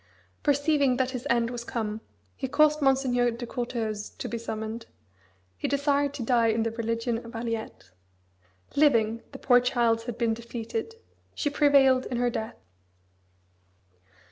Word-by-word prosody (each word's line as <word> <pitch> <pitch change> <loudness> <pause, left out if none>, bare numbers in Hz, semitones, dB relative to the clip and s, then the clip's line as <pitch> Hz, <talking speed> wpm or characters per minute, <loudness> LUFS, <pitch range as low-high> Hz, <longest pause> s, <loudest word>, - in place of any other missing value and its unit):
Perceiving 285 -2 +2
that 260 0 0
his 250 -2 -5
end 235 0 +2
was 240 -1 -5
come, 220 -3 -3 0.3
he 265 - -3
caused 305 +3 +3
Monseigneur 260 -3 +3
de 235 +1 -5
Courteheuse 225 -3 -3
to - - -4
be 235 - -4
summoned 220 0 -5 0.7
he - - -1
desired 285 0 +1
to 265 - -4
die 235 -1 +3
in 225 0 +2
the 230 - -1
religion 230 +1 -2
of 230 +1 -11
Aliette. 225 - -5 0.8
Living, 230 -6 +3
the 270 - -8
poor 245 -2 +5
child 235 -2 +1
had 240 -2 -5
been 230 -2 +1
defeated: 235 - -5 0.4
she 290 - -1
prevailed 275 -3 +4
in 245 - -3
her 245 0 +1
death. 220 0 -4
240 Hz, 145 wpm, -27 LUFS, 230-270 Hz, 0.8 s, poor